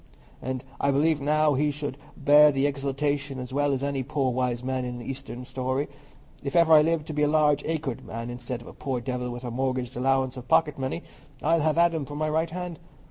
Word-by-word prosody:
And 130 0 -3 0.2
I 140 - +2
believe 145 +2 +2
now 150 +1 +3
he 145 +2 +2
would 145 -2 -2 0.2
bear 150 +1 +7
the 135 0 +1
exaltation 140 0 -1
as 125 0 -6
well 145 +1 +2
as 135 0 -1
any 140 -1 -1
poor 135 0 0
wise 125 -1 -1
man 130 0 -1
in 125 0 -4
an 120 - -7
Eastern 130 -2 -6
story. 130 +2 -2 0.5
If 140 +2 -4
ever 170 -1 +6
I 155 - +9
live 160 -1 +1
to 155 - -6
be 150 - -1
a 150 - +4
large 150 -1 +3
acred 150 -6 -3
man 115 +1 -6
instead 120 0 -5
of - - -15
a - - -10
poor 130 -3 -3
devil 125 0 -3
with 120 +1 -6
a 120 - -4
mortgaged 130 0 -2
allowance 130 +1 +1
of 125 0 -8
pocket 150 0 +3
money, 135 +6 -3 0.4
I'll 165 +1 +3
have 155 +1 +1
Adam 165 -3 +3
for 145 - -8
my 155 +1 -1
right 160 +2 +1
hand. 175 0 -5
140 Hz, 225 wpm, -26 LUFS, 130-150 Hz, 0.5 s, I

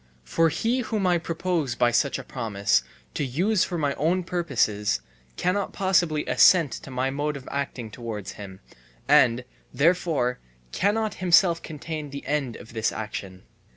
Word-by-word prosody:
For 165 - +2
he 225 - 0
whom 220 -5 -1
I 175 -1 +3
propose 165 -5 -2
by 120 0 +3
such 140 +3 +1
a - - -7
promise 105 - 0 0.3
to - - -2
use 175 - +1
for 175 - -3
my 145 -3 0
own 175 +6 0
purposes 130 - 0 0.4
cannot 185 +2 0
possibly 175 -6 +1
assent 170 -7 +5
to - - -8
my 130 +1 -1
mode 145 +1 -2
of 130 - -12
acting 135 -5 -4
towards 110 -4 -6
him 95 -2 -10 0.5
and, 125 0 +4 0.3
therefore, 145 -4 +1 0.3
cannot 210 +2 0
himself 175 -1 +4
contain 155 -1 -6
the 140 0 -8
end 140 -5 -1
of 110 - -12
this 110 -1 0
action. 95 -4 -6
145 Hz, 155 wpm, -25 LUFS, 120-175 Hz, 0.5 s, assent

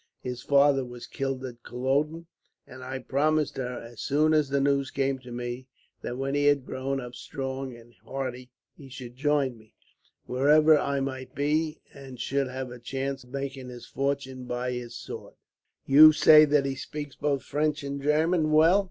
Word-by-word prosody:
His 125 -1 -5
father 140 0 +4
was 125 -1 -9
killed 135 -1 -3
at 120 -2 -9
Culloden, 145 +7 -1 0.4
and 130 0 -11
I 130 +1 -4
promised 150 +4 0
her, 125 -1 -3
as 115 -1 -10
soon 155 +3 +2
as 150 -3 +2
the 140 0 +1
news 140 -1 +1
came 135 -1 -1
to 125 -1 -12
me, 120 +1 -5 0.3
that 120 - -5
when 135 +1 -2
he 145 0 +1
had 145 -2 +3
grown 135 +1 -3
up 125 -1 -8
strong 130 +1 -5
and 120 0 -17
hearty 130 -2 -5 0.3
he 140 -3 -13
should 125 -2 -9
join 140 -3 0
me, 110 -1 -22 0.5
wherever 150 +5 +5
I 140 -1 0
might 130 -1 -5
be, 150 +2 0
and 135 -3 -11
should 135 +2 0
have 130 0 -5
a 125 - -9
chance 135 +2 -4
of 125 - -19
making 135 -1 -5
his 120 -1 -10
fortune 135 -1 -3
by 125 +1 -3
his 125 -1 -6
sword.' - - -8 0.5
"'You 155 +3 +9
say 155 0 +8
that 145 -1 +2
he 135 - -1
speaks 145 +1 -7
both 140 -2 -1
French 150 0 -1
and 140 0 -4
German 155 +2 +2
well? 165 +5 +6
135 Hz, 180 wpm, -27 LUFS, 125-145 Hz, 0.5 s, You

